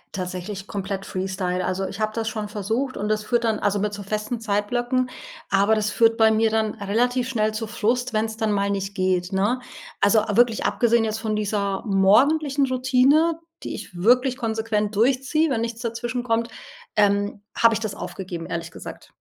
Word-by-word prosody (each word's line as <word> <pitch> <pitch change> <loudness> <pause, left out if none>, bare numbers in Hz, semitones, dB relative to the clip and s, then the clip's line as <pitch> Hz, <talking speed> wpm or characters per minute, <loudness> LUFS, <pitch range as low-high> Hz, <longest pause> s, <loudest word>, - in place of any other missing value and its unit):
Tatsächlich 185 +2 -5
komplett 195 -1 -4
freestyle, 185 -1 -2
also, 190 +1 -1
ich 200 - -8
habe 215 0 -1
das 225 -1 -1
schon 215 -1 -4
versucht 220 +6 -2
und 210 - -2
das 215 0 0
führt 240 0 +1
dann 220 -2 +1
also, 205 0 +1
mit 210 +1 -1
so 205 - -6
festen 215 +4 -3
Zeitblöcken, 240 +4 0 0.4
aber 200 +3 +3
das 215 -1 0
führt 225 +1 +4
bei 220 -1 +5
mir 220 +1 +3
dann 220 -1 0
relativ 240 +5 0
schnell 215 -4 0
zu 220 +1 -3
Frust, 240 +3 -1
wenn's 220 0 -1
dann 220 -1 0
mal 200 0 +1
nicht 195 0 -3
geht, 185 -1 0
ne? 205 +7 +1 0.4
Also, 215 +1 +5
wirklich 230 +1 +3
abgesehen 235 -1 +3
jetzt 220 0 -2
von 220 -1 -2
dieser 200 -2 -1
morgendlichen 275 +9 +3
Routine, 260 +6 +3 0.2
die - - -4
ich - - -9
wirklich 250 +4 +4
konsequent 220 -2 -1
durchziehe, 270 +8 +2
wenn 255 -5 0
nichts 230 0 -4
dazwischen 240 +1 -3
kommt, 230 -1 0 0.5
ähm, 205 0 +2 0.2
habe 230 -1 +5
ich 220 - -1
das 215 -3 -3
aufgegeben 175 -3 -6
ehrlich 170 0 -5
gesagt. - - -10
220 Hz, 180 wpm, -23 LUFS, 200-240 Hz, 0.5 s, bei